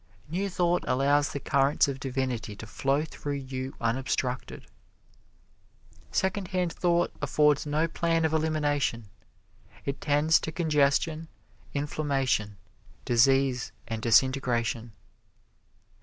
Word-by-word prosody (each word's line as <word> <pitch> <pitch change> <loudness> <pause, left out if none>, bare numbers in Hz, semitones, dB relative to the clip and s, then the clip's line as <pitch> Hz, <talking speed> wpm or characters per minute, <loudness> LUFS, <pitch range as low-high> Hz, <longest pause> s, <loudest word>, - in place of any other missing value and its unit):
New 185 +6 -2
Thought 175 -1 +1
allows 140 +3 +2
the 140 - -4
currents 140 +1 +2
of 135 -1 -4
divinity 130 -5 -3
to 110 - -9
flow 135 +6 0
through 145 -2 -5
you 130 -1 -5
unobstructed. 125 +1 -2 1.5
Secondhand 185 -2 -1
Thought 175 -1 +1
affords 150 0 +2
no 155 +3 +1
plan 165 0 0
of 160 - 0
elimination; 145 -8 0 0.8
it 140 0 -3
tends 150 +2 +3
to 160 - -4
congestion, 155 0 +1 0.5
inflammation, 135 -8 -1 0.5
disease 130 +1 +3 0.2
and 115 -1 -4
disintegration. 120 -2 +2
140 Hz, 100 wpm, -28 LUFS, 130-155 Hz, 1.5 s, tends